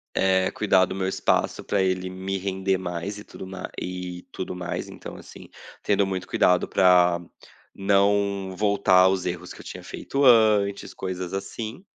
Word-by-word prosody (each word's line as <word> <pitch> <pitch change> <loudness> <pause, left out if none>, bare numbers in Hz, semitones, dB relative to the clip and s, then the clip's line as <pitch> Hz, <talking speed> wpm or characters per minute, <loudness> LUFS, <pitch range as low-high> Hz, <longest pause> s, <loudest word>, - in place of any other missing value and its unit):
eh, 95 -1 +2
cuidar 95 -3 +3
do 95 - -6
meu 95 -1 -1
espaço 95 - 0
para 100 - 0
ele 95 0 0
me 95 +1 -4
render 95 0 -1
mais 90 +2 -5
e 105 - -9
tudo 95 - -10
ma 95 -1 -7
e 90 -1 -6
tudo 90 - -5
mais 90 -1 -4
então - - -9
assim, - - -13 0.3
tendo 100 -1 +2
muito 95 -1 -3
cuidado 90 0 +2
para 90 -2 +4 0.5
não 100 -1 +1
voltar 100 -2 +3
aos 95 0 +3
erros 90 0 -4
que - - -14
eu - - -12
tinha - - -8
feito 140 +1 -3
antes, 110 -5 +4
coisas 95 -1 -5
assim. 110 - -5
95 Hz, 165 wpm, -25 LUFS, 90-100 Hz, 0.5 s, para